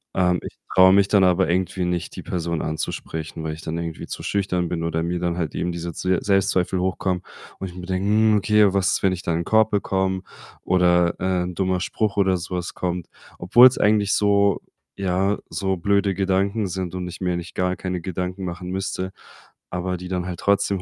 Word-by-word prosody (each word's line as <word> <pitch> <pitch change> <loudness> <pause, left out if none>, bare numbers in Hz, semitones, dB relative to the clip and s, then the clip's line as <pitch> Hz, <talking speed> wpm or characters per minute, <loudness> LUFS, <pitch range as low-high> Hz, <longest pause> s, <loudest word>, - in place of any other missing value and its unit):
Ähm, 90 -1 +2
ich - - -9 0.2
traue 95 0 +7
mich 100 0 +5
dann 100 -2 +4
aber 90 +1 +3
irgendwie 90 +1 0
nicht, 90 -1 -3
die - - -7
Person 85 -2 -2
anzusprechen, 80 0 -4
weil 80 -1 -3
ich 80 - -9
dann 80 +1 -4
irgendwie 85 -1 -5
zu - - -6
schüchtern 90 -3 0
bin 85 -2 -2
oder 80 0 -1
mir 85 +1 -2
dann 85 -1 -1
halt 80 -4 -3
eben 90 - -1
diese 85 0 -5
Zwe 90 +2 0
Selbstzweifel 95 -2 +1
hochkommen 95 0 -1 0.4
und 95 - -4
ich 90 - -13
mir 90 -1 -7
denke: 95 +2 -1
„Hm, 110 0 +4
okay, 105 -1 +4
was 95 -2 +2
ist, - - 0
wenn 95 -1 +3
ich 90 - -5
da 85 - -1
'n 85 +1 -1
Korb 110 0 +4
bekomme 95 -2 0 0.4
oder, 90 -1 +3
äh, 90 0 0
'n 90 0 -5
dummer 95 -1 0
Spruch 105 +1 -1
oder 95 -2 +3
so 90 +1 -5
was 90 -1 -4
kommt?“ 90 -1 -3 0.3
Obwohl's 120 +8 +7
eigentlich 105 -1 +3
so 100 -1 +3 0.4
ja, 95 +1 +1
so 95 -1 -1
blöde 100 +2 +1
Gedanken 100 +2 0
sind 95 -1 -4
und 90 -1 -4
ich 90 - -9
mir 90 -1 0
eigentlich 85 -1 -5
gar 90 0 0
keine 90 -1 -3
Gedanken 90 +2 -4
machen 90 0 -5
müsste, 95 0 -3 0.6
aber 90 +1 -2
die 90 +1 -8
dann 90 -1 -2
halt 90 -2 -5
trotzdem 100 -1 +1
90 Hz, 210 wpm, -23 LUFS, 90-95 Hz, 0.6 s, traue